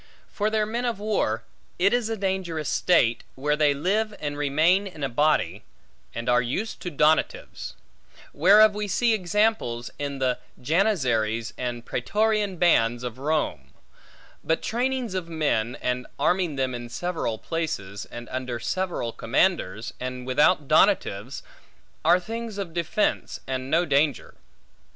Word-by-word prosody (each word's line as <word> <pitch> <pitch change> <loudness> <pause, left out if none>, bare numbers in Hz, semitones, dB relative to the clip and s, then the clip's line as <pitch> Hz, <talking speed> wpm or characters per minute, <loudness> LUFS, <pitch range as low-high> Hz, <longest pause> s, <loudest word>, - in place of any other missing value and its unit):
For 210 +1 0
their 215 -1 +1
men 235 +3 -3
of 235 -3 -1
war; 195 - -1 0.3
it 195 +4 +3
is 240 -2 +1
a 225 - -2
dangerous 190 -6 -2
state, 120 -10 +2
where 150 +3 0
they 150 -2 +3
live 205 +8 0
and 145 -1 -3
remain 155 +7 +2
in 160 -6 -8
a 135 - 0
body, 150 +5 +1 0.5
and 115 0 -4
are 125 0 +4
used 165 - -3
to 180 - -4
donatives; 155 0 0 0.6
whereof 205 +7 +6
we 210 0 -3
see 230 +4 +2
examples 195 - 0
in 140 -1 -3
the 130 -2 0 0.2
janizaries, 125 - +1
and 120 -1 -4
pretorian 210 - 0
bands 120 -9 +3
of 125 0 -5
Rome; 135 - -2 0.7
but 160 - 0
trainings 250 -2 -1
of 180 -3 -3
men, 145 -8 0
and 125 0 -1
arming 175 +1 +1
them 130 -1 -1
in 120 -1 -6
several 165 -7 -2
places, 110 - -4
and 120 0 -9
under 125 -2 -4
several 175 -3 -2
commanders, 115 - 0
and 125 0 -5
without 150 +4 +3
donatives, 135 - +2 0.6
are 175 +3 +5
things 225 +2 -6
of 190 -5 -5
defence, 175 +5 -1
and 130 0 -3
no 165 +4 +3
danger. 145 -3 +1
155 Hz, 140 wpm, -25 LUFS, 125-195 Hz, 0.7 s, whereof